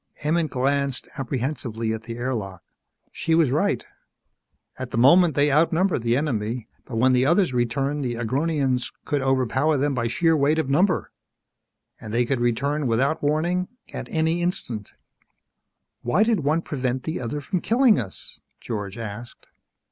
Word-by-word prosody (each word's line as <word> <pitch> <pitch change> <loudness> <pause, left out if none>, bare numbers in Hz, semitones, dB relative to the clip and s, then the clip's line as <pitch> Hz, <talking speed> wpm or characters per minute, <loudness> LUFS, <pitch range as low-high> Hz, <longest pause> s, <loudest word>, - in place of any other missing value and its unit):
Emmett 160 +1 +1
glanced 135 0 0
apprehensively 120 -4 -2
at 110 - -4
the 115 0 -6
air 130 +2 -2
lock. 95 -6 -5 0.5
She 165 - 0
was 160 -6 +3
right. 180 +9 0 0.9
At 130 -1 -4
the 115 - -4
moment 160 +6 +6
they 145 0 +3
outnumbered 165 +2 +2
the 120 +1 +1
enemy, 120 -5 -2 0.2
but 125 - -7
when 130 +3 +4
the 125 +1 +3
others 170 -2 +3
returned 135 +4 0
the 120 -2 -2
Agronians 130 +2 0
could 145 -3 0
overpower 135 +3 +1
them 140 +1 +1
by 120 -2 -1
sheer 165 +7 +2
weight 150 +1 +2
of 155 -4 -1
number. 180 +6 +2 0.9
And 110 - -8
they 120 +2 +2
could 130 +1 -1
return 140 +5 0
without 130 +7 +1
warning, 170 +5 0 0.3
at - - -6
any 160 +1 0
instant. 120 - -4 1.1
"Why 150 - +2
did 225 -2 +2
one 155 +3 +1
prevent 130 -2 -2
the 160 - -3
other 125 +5 -3
from 175 +5 -2
killing 235 -1 +4
us?" 95 -5 -7 0.2
George 105 -2 -5
asked. 115 +1 -8
135 Hz, 155 wpm, -24 LUFS, 120-160 Hz, 1.1 s, moment